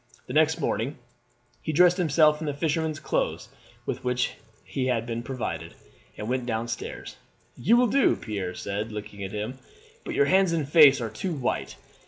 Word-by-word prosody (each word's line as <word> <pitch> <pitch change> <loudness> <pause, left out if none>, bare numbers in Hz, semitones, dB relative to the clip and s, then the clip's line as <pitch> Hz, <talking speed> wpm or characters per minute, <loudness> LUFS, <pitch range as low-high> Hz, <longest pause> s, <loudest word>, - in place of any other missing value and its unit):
The - - -7
next 160 +1 +3
morning 135 -1 -1 0.6
he 155 - -2
dressed 175 +3 +5
himself 155 -3 +3
in 155 - -3
the 145 - -2
fisherman's 155 +1 -1
clothes - - -2 0.4
with - - -4
which 125 0 0 0.3
he 130 -2 -2
had 115 -3 0
been 115 0 -3
provided, 110 -11 -5 0.4
and 105 - -5
went 125 0 -1
down 115 0 -1
stairs. - - -6 0.4
"You 225 - +3
will 250 - +5
do," 270 +4 +3
Pierre 95 -5 -4
said, 105 +3 -4
looking 105 -1 -7
at 95 - -5
him; 110 +5 -4 0.4
"but - - -5
your 425 - +4
hands 190 -2 +3
and 155 -4 -1
face 145 -4 +7
are 115 -2 -3
too 185 -3 -3
white. 130 -4 -2
135 Hz, 180 wpm, -26 LUFS, 115-160 Hz, 0.6 s, face